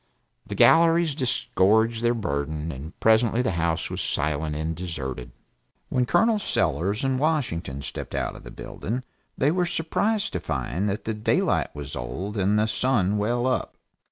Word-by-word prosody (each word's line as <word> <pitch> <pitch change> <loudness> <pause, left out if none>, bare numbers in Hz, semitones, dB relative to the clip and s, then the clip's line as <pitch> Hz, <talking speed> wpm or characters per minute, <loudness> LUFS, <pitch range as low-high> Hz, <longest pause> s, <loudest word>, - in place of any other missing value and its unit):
The - - -5
galleries 165 -1 +5
disgorged 115 -4 +2
their 120 0 +2
burden, 75 -5 -2
and 75 +4 -9
presently 110 +2 +3
the 125 - +1
house 85 -1 -1
was - - -3
silent 75 0 -1
and 80 +2 -2
deserted. 65 -8 -5 0.6
When 125 -1 +1
Col. 220 - +3
Sellers 100 - 0
and 135 -1 +1
Washington 100 - -1
stepped - - -6
out - - -2
of - - -12
the - - -9
building 120 +6 -5 0.3
they 140 +3 +3
were 180 +1 +1
surprised 200 +6 0
to 90 - -1
find 80 +6 -2
that 100 - -3
the 110 - -1
daylight 105 0 +1
was 70 -1 -6
old 95 - -5
and 100 +1 +2
the 105 - +3
sun 105 -3 +1
well 120 +4 0
up. 130 0 -1
105 Hz, 160 wpm, -25 LUFS, 80-130 Hz, 0.6 s, galleries